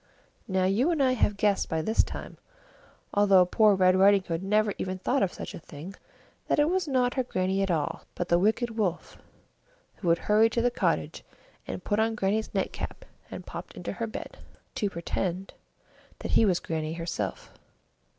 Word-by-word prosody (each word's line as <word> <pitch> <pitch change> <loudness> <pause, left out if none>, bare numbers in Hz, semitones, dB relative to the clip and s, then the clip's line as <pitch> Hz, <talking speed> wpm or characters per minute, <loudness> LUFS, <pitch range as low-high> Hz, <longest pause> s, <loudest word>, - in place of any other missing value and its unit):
Now, 190 -2 +1
you 215 - +2
and 320 -5 +2
I 260 - +4
have 210 -5 +1
guessed 200 -1 +1
by 160 -1 -1
this 220 +6 +3
time, - - -8 0.7
although 195 -3 +5
poor 210 +3 +4
Red 185 -1 +4
Riding 195 +1 +5
Hood 165 -2 -3
never 210 +1 +2
even 185 0 -3
thought 255 +8 0
of 185 - +1
such - - -7
a - - -7
thing, 160 +4 -10 0.5
that - - +1
it 295 +3 +3
was 370 -2 0
not 255 -3 +1
her 260 - 0
Grannie 190 -4 -1
at 195 - 0
all, 160 -4 -1
but 175 - -3
the 170 0 +3
wicked 225 +4 +1
Wolf, 195 -6 -2 0.8
who 180 - -2
had 165 - +4
hurried 215 +4 +3
to 235 - +1
the 245 - +3
cottage - - -1 0.4
and - - -5
put 205 0 0
on 225 0 +1
Grannie's 210 +2 -1
nightcap - - -4 0.2
and - - -8
popped - - -8
into - - -5
her 230 - -3
bed, 220 - -8 0.3
to 205 - -1
pretend 180 +1 -3 0.6
that - - -5
he 225 - +5
was 185 -4 +2
Grannie 160 -1 -3
herself. 165 - -4
195 Hz, 185 wpm, -27 LUFS, 180-225 Hz, 0.8 s, although